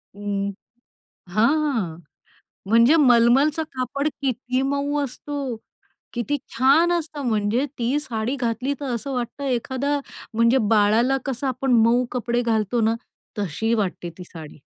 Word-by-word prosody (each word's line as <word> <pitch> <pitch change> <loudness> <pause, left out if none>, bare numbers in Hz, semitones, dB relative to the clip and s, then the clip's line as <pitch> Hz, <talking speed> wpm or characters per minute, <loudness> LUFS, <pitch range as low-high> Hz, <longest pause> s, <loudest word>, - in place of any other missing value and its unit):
हं. 200 -1 -2 0.8
हां. 230 - +1 0.7
म्हणजे 230 +7 +6
मलमलचं 270 +3 +4
कापड 260 +3 -2
किती 255 -1 -1
मऊ 280 +2 -1
असतं, 275 -1 -5 0.6
किती 240 +4 -1 0.2
छान 285 +8 +4
असतं. 315 -4 -3
म्हणजे 215 +3 +1
ती 245 +4 +1
साडी 245 -2 -3
घातली 250 +2 -1
तर 270 -4 -2
असं 270 +4 -4
वाटतं, 250 +2 -4
एखादं 265 +3 -1 0.3
म्हणजे 230 +3 +4
बाळाला 225 +5 +4
कसं 270 0 -3
आपण 260 0 -1
मऊ 240 +2 +3
कपडे 240 0 -1
घालतो 225 0 0
ना, 225 0 +2 0.4
तशी 205 +4 -1
वाटते 185 -5 -2
ती 180 - -8
साडी. 160 -4 -11
245 Hz, 125 wpm, -23 LUFS, 225-275 Hz, 0.8 s, म्हणजे